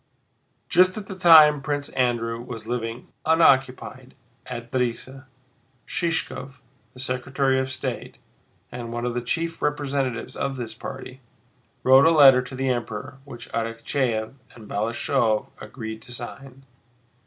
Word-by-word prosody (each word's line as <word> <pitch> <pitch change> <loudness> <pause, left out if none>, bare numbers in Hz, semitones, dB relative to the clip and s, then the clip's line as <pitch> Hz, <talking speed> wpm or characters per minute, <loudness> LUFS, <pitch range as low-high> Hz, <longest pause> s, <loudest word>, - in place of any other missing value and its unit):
Just 185 +2 +4
at 210 - -6
the 195 - -7
time 155 -5 +7
Prince 145 0 -3
Andrew 120 -2 -1
was 120 -3 -8
living 115 0 -4
unoccupied 130 -5 +2 0.3
at 120 0 -7
Drissa, 130 +2 -3 0.6
Shishkóv, 165 -8 -2 0.4
the - - -12
Secretary 130 +1 0
of 130 0 -2
State 130 - -5 0.5
and 120 -1 -6
one 120 +1 -3
of 120 - -1
the 120 - -2
chief 165 +7 -3
representatives 140 -5 -2
of 140 -1 -2
this 115 -3 -5
party, 130 +2 -9 0.6
wrote 130 +3 +7
a - - +7
letter 140 -5 +7
to 130 +1 -9
the 135 0 -1
Emperor 125 +2 -4
which 120 -4 -10
Arakchéev 115 0 -2 0.2
and 110 -3 -13
Balashëv 115 +1 0
agreed 110 -3 -7
to 125 - -13
sign. 135 +2 -9
130 Hz, 130 wpm, -24 LUFS, 120-140 Hz, 0.6 s, time